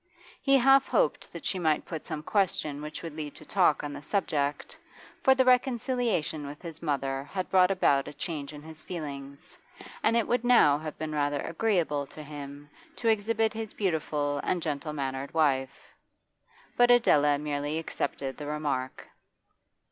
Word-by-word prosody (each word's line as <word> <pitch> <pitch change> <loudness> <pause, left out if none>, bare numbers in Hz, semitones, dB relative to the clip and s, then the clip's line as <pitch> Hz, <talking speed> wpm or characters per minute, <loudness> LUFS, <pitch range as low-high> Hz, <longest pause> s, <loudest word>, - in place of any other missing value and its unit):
He 275 -1 +5
half 270 +1 +5
hoped - - 0
that - - -9
she 185 - -1
might 155 -3 +1
put 160 -3 -6
some 155 -2 -5
question 155 -7 0
which 150 +2 -7
would 165 -3 -6
lead 150 -2 -6
to - - -12
talk 180 -7 +2
on 145 0 -4
the 145 - -7
subject, 145 -4 -1 0.5
for 265 - +5
the 260 -1 +3
reconciliation 245 - +1
with 145 +2 -8
his 165 -3 -8
mother 135 -3 -1
had 185 +5 -4
brought 185 -1 +5
about 140 -8 +2
a - - -7
change 150 -1 -4
in 150 -1 -10
his 160 0 -9
feelings, 140 -2 -7 0.4
and 230 - +3
it 230 - +1
would 245 0 +1
now 230 -13 +5
have 155 0 -7
been 155 -1 -4
rather 145 -1 0
agreeable 165 -6 0
to 155 +2 -10
him 145 -1 -9 0.3
to 230 - 0
exhibit 220 +1 +1
his 220 -1 -5
beautiful 150 -6 -1
and 175 -3 -1
gentle 150 0 -3
mannered 135 0 -4
wife. 135 -4 0 0.8
But 245 0 +5
Adela 150 -12 +5
merely 145 +1 -2
accepted 140 -4 -3
the 150 - -6
remark. 145 -4 -3
155 Hz, 165 wpm, -28 LUFS, 145-195 Hz, 0.8 s, He